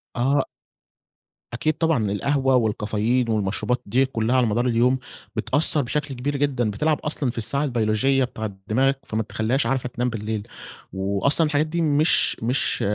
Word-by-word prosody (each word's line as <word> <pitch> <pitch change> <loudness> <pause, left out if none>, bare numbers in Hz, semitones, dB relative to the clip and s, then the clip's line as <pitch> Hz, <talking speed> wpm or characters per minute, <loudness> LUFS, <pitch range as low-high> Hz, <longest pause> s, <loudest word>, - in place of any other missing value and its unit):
آه. 135 +3 +2 1.1
أكيد 155 +6 0
طبعًا 145 -12 +1
القهوة 135 +5 +1
والكافيين 110 +2 0
والمشروبات 110 +3 0
دي 130 +6 +2
كلها 120 -1 -1
على 125 - +3
مدار 120 +4 0
اليوم 125 +2 +2 0.4
بتأثر 145 +1 +2
بشكل 140 +1 -3
كبير 140 +3 -2
جدًا 130 -6 0
بتلعب 150 +8 0
أصلًا 145 -4 -1
في - - -14
الساعة 140 +6 -1
البيولوجية 125 +1 +1
بتاعة 110 -5 -5
دماغك، 135 +4 +2
فما 110 +1 -2
بتخليهاش 110 +5 -1
عارفة 130 -2 -1
تنام 125 +1 -2
بالليل 110 -1 -4 0.5
وأصلًا 100 - +2
الحاجات 150 +1 +1
دي 170 +2 -2
مش 155 +1 +2
مش 125 +4 0
125 Hz, 150 wpm, -23 LUFS, 110-140 Hz, 1.1 s, على